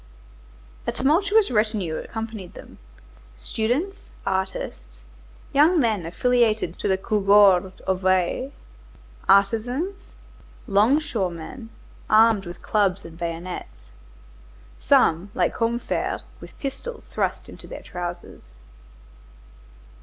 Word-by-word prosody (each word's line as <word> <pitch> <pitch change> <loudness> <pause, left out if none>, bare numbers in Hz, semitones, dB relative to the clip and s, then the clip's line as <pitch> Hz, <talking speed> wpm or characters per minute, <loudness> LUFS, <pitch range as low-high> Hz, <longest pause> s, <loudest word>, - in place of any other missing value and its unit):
A - - +2
tumultuous 390 +7 +2
retinue 210 -7 0
accompanied 220 -5 -6
them,—students, 275 - -5 0.2
artists, 125 - -4 0.5
young 315 +5 +5
men 215 - +1
affiliated 220 -2 +1
to - - -1
the 190 - +2
Cougourde 195 -2 +4
of 190 0 -2
Aix, 185 +8 +1 0.8
artisans, 245 - +2 0.6
longshoremen, 220 - 0 0.4
armed 215 -3 +5
with 175 0 -9
clubs 200 -3 +1
and 165 -1 -10
bayonets; 170 +1 -6 0.9
some, 165 - +3
like - - +1
Combeferre, 235 +1 -1 0.2
with - - -13
pistols 450 - -6
thrust - - -2
into - - -11
their - - -9
trousers. 175 -1 -7
210 Hz, 90 wpm, -24 LUFS, 185-245 Hz, 0.9 s, young